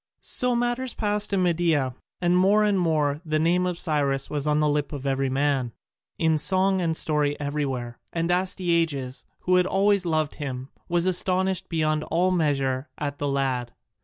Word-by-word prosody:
So 250 -1 +1
matters 240 +1 -1
passed 210 -1 0
in 195 -2 +1
Media: 165 -7 +1 0.3
and 175 0 +2
more 200 +4 +4
and 205 -2 +2
more 155 -4 0
the 155 -2 -1
name 175 +3 +2
of 180 -1 -3
Cyrus 140 -5 0
was 150 -1 -1
on 150 0 +2
the 150 - +2
lip 145 0 -1
of 140 -1 -6
every 135 0 0
man, 135 -3 0 0.4
in 160 -2 +2
song 190 +3 +2
and 165 -2 0
story 150 -2 +1
everywhere, 135 -5 -3
and 170 +1 -1
Astyages, 170 -7 0 0.2
who 180 0 +2
had 180 0 +3
always 200 0 +2
loved 155 -3 0
him, 130 -2 -5 0.2
was 175 0 +1
astonished 185 0 +1
beyond 155 -2 0
all 180 +3 +1
measure 140 -5 0
at 145 -1 -4
the 145 - -1
lad. 130 -3 -1
160 Hz, 170 wpm, -25 LUFS, 145-180 Hz, 0.4 s, more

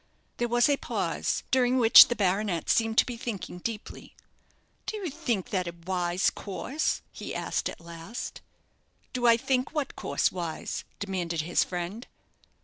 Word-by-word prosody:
There 240 - 0
was 240 0 +4
a 285 -1 +3
pause, - - -2
during 255 0 +3
which 230 -2 +10
the 240 - -1
baronet 195 -3 0
seemed 225 -1 +2
to - - +6
be 245 -2 -5
thinking 205 -6 -5
deeply. 220 +2 -6 0.7
"Do 430 - -2
you 370 -7 -4
think 245 - -2
that 185 -3 0
a 170 - -5
wise 180 0 +1
course?" 260 +9 -3
he - - -7
asked, - - -1
at - - -9
last. 170 +6 -7 0.7
"Do 245 -1 +1
I 230 -1 +7
think 255 +4 0
what 290 -3 -2
course - - 0
wise?" 170 -3 -4
demanded 175 -5 -2
his 170 +3 +2
friend. 180 +6 -5
220 Hz, 155 wpm, -28 LUFS, 180-245 Hz, 0.7 s, which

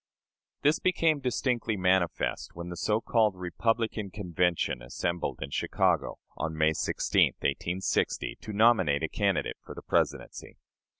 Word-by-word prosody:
This 150 +2 +3
became 165 -4 +2
distinctly 125 -4 -1
manifest 90 -2 0
when 85 +1 -6
the 90 - -5
so 105 +5 0
called 110 -5 +2
"Republican" 110 +3 -1
Convention 90 - -1
assembled 85 +7 -3
in 70 - -8
Chicago, - - 0 0.2
on 80 -1 -3
May 80 0 +3
16, - - +2
1860, 90 +6 -1
to 110 - -7
nominate 100 -9 +3
a - - +1
candidate 100 -3 -1
for - - -10
the - - -9
Presidency. - - -2
95 Hz, 130 wpm, -29 LUFS, 85-115 Hz, 0.2 s, This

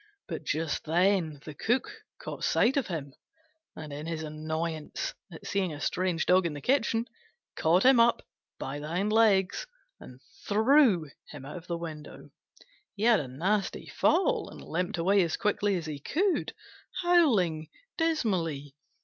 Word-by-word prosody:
But - - -5
just 155 -1 -2
then 170 -3 +1
the 155 - -7
Cook 240 - 0 0.3
caught - - -7
sight 265 - +3
of 280 - 0
him, 150 -7 -5 0.6
and, 155 -2 -8
in 150 +2 -6
his 165 -1 -3
annoyance 155 +1 -4 0.2
at 160 - -11
seeing 195 -3 -1
a 145 - -7
strange 180 +2 -1
Dog 180 -1 +4
in 160 - -5
the 145 - -6
kitchen, 235 - +1 0.5
caught 170 +4 +3
him 260 -1 +6
up 235 0 +4 0.3
by 140 +2 -5
the 150 - -6
hind 190 +6 -1
legs 205 -4 +3 0.3
and 125 0 -13 0.3
threw 220 - +4 0.2
him 145 -3 -10
out 145 +6 -7
of 175 0 -11
the 170 - -2
window. 155 -3 -9 0.6
He 205 - -5
had 230 -2 +5
a 140 - -4
nasty 190 +10 -1
fall, 470 +4 +1
and - - -11
limped 175 +2 -2
away 195 +4 +3
as 170 -3 0
quickly 205 -1 +1
as 170 -3 -3
he 150 -2 -5
could, 365 - 0 0.5
howling 215 - +3 0.3
dismally. 185 - -1
180 Hz, 160 wpm, -29 LUFS, 155-220 Hz, 0.6 s, him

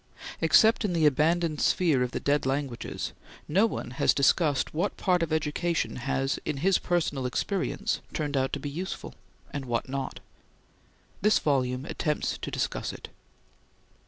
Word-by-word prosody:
Except 220 +9 +5
in 200 -4 0
the 165 -2 +2
abandoned 155 +2 +2
sphere 160 -8 +3
of 125 - +1
the - - -3
dead 145 +1 +1
languages, 135 -3 -3 0.3
no 195 +9 +4
one 120 - -5
has 125 - +2
discussed 145 +1 +2
what 175 +6 -1
part 180 -2 +2
of 165 -1 -1
education 160 +2 0
has, 135 +2 -1
in 145 - -2
his 195 -1 +4
personal 150 -7 0
experience, 200 - -1
turned 145 -3 -2
out 135 0 +1
to 145 - -1
be 145 - -5
useful, 180 +6 -5 0.4
and 140 -2 -4
what 120 0 -1
not. 135 0 -4 1.0
This 210 +2 +4
volume 130 -2 0
attempts 150 -2 -2
to - - -4
discuss - - -2
it. - - -10
150 Hz, 155 wpm, -28 LUFS, 135-175 Hz, 1.0 s, Except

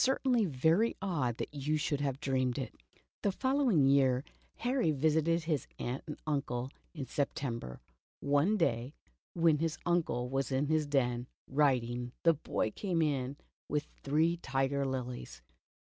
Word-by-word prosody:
certainly 255 -3 +3
very 165 - +2
odd 145 - -1
that - - -5
you 150 +2 0
should 145 -1 -1
have 140 -2 -1
dreamed 130 -3 0
it." 135 - -4 0.5
The 200 - +2
following 260 - +3
year 135 -2 +4 0.3
Harry 245 -6 +1
visited 160 +3 +2
his 155 -4 -1
aunt 125 +3 -3
and 150 - -5
uncle 135 -4 -1 0.2
in 140 -4 -4
September. 125 - -3 0.4
One 145 +9 +2
day 125 - 0 0.4
when 165 -3 +4
his 165 0 -1
uncle 160 -8 +1
was 135 +2 -1
in 135 +2 +1
his 155 0 +1
den, 125 -3 +1 0.2
writing, 125 -4 +1
the 165 - +6
boy 125 -7 -2
came 175 - 0
in 140 -2 -1 0.3
with 150 0 0 0.2
three 160 +5 +2
tiger 135 -2 0
lilies. 125 - -5
145 Hz, 145 wpm, -32 LUFS, 130-165 Hz, 0.5 s, the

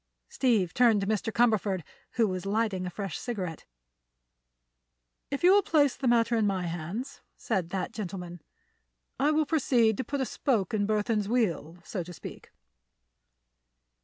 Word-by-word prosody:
Steve 235 - +1
turned 235 -4 +4
to 195 - -2
Mr. 220 +2 -1
Cumberford, 210 -6 +2 0.3
who 230 -3 +3
was 185 -2 -3
lighting 200 -3 0
a - - -2
fresh 195 -1 -5
cigarette. 185 -10 -5 1.6
"If 280 +3 -4
you 360 - +7
will 405 - +6
place 290 -7 +2
the 265 - -2
matter 235 0 +3
in 220 -2 +2
my 190 -2 -1
hands," 175 - -5 0.2
said 190 -7 -2
that 185 0 -3
gentleman, 180 -4 -6 0.8
"I 285 - +3
will 310 0 +2
proceed 245 -8 +2
to - - -1
put 285 +1 -3
a 265 - +1
spoke 225 - -1
in 205 -2 +1
Burthon's 210 -1 0
wheel, 180 -9 0
so 190 - -4
to 175 +1 -8
speak. - - -10
215 Hz, 155 wpm, -28 LUFS, 185-245 Hz, 1.6 s, you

